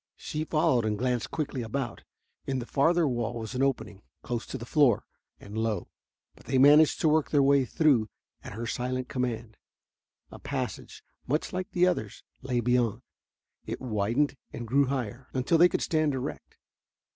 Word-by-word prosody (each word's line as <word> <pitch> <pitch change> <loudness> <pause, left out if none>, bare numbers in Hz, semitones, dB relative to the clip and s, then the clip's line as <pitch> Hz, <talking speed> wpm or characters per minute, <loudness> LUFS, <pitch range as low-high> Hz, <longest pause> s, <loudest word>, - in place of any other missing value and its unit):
She 155 +1 -4
followed 145 -7 +2
and 105 -1 -1
glanced 125 -1 -1
quickly 145 -4 -3
about. 120 +2 -4 0.4
In 135 - -1
the 120 - -4
farther 165 +5 +2
wall 120 -2 -2
was 110 0 -6
an 130 - -1
opening, 110 -7 -1 0.2
close 120 -1 -4
to - - -5
the 120 - -8
floor, 135 -5 +3 0.3
and 100 +1 -10
low, 110 -1 -2 0.4
but - - -20
they 135 - +1
managed 145 +3 +6
to - - +3
work 155 0 +2
their 145 -2 +3
way 140 -1 +4
through 130 -7 +2 0.3
at - - -8
her 115 +3 -5
silent 125 +3 -3
command. 120 -3 -3 0.7
A - - -10
passage, - - -5 0.2
much 150 +5 -1
like 185 +2 -3
the 180 -3 +3
others, 110 - -2 0.2
lay 125 -2 -1
beyond. 120 -2 +1 0.6
It - - -4
widened 120 +5 0 0.2
and 120 - -6
grew 140 +4 +3
higher, 130 -1 -4
until 135 +6 +2
they 175 +1 +7
could - - -1
stand 155 -3 +1
erect. 130 - -6
130 Hz, 170 wpm, -28 LUFS, 115-145 Hz, 0.7 s, they